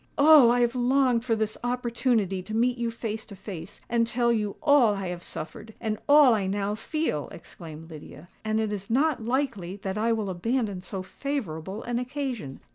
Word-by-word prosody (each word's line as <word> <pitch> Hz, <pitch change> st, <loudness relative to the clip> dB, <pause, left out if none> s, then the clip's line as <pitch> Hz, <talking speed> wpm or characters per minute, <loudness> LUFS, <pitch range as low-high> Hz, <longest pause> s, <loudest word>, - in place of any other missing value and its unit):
"Oh! 290 Hz, -4 st, +8 dB
I 245 Hz, +1 st, +3 dB
have 240 Hz, 0 st, +2 dB
longed 250 Hz, -1 st, +2 dB
for 235 Hz, -2 st, +1 dB
this 215 Hz, -1 st, -2 dB
opportunity 235 Hz, -5 st, 0 dB
to 215 Hz, +4 st, -6 dB
meet 245 Hz, +1 st, +1 dB
you 235 Hz, -1 st, 0 dB
face 225 Hz, -1 st, -4 dB
to 200 Hz, -, -10 dB
face, 195 Hz, 0 st, -9 dB
and 235 Hz, -1 st, +1 dB
tell 235 Hz, 0 st, +1 dB
you 210 Hz, -3 st, -1 dB
all 260 Hz, -8 st, +5 dB
I 195 Hz, -2 st, -4 dB
have 175 Hz, -1 st, -5 dB
suffered, 215 Hz, +7 st, -8 dB
and 215 Hz, -1 st, -2 dB
all 290 Hz, -4 st, +8 dB
I 200 Hz, -3 st, 0 dB
now 200 Hz, +1 st, -1 dB
feel!" 220 Hz, -, -2 dB
exclaimed 160 Hz, -1 st, -11 dB
Lydia; 155 Hz, +1 st, -11 dB, 0.2 s
"and 215 Hz, 0 st, 0 dB
it 220 Hz, -1 st, -1 dB
is 200 Hz, -2 st, -5 dB
not 270 Hz, +1 st, +2 dB
likely 230 Hz, -7 st, -1 dB
that 195 Hz, +1 st, -2 dB
I 230 Hz, +2 st, +2 dB
will 215 Hz, -4 st, -1 dB
abandon 205 Hz, +1 st, -1 dB
so 190 Hz, 0 st, -6 dB
favourable 195 Hz, -, -4 dB
an 240 Hz, 0 st, -2 dB
occasion. 250 Hz, -, -4 dB
225 Hz, 190 wpm, -26 LUFS, 195-245 Hz, 0.2 s, Oh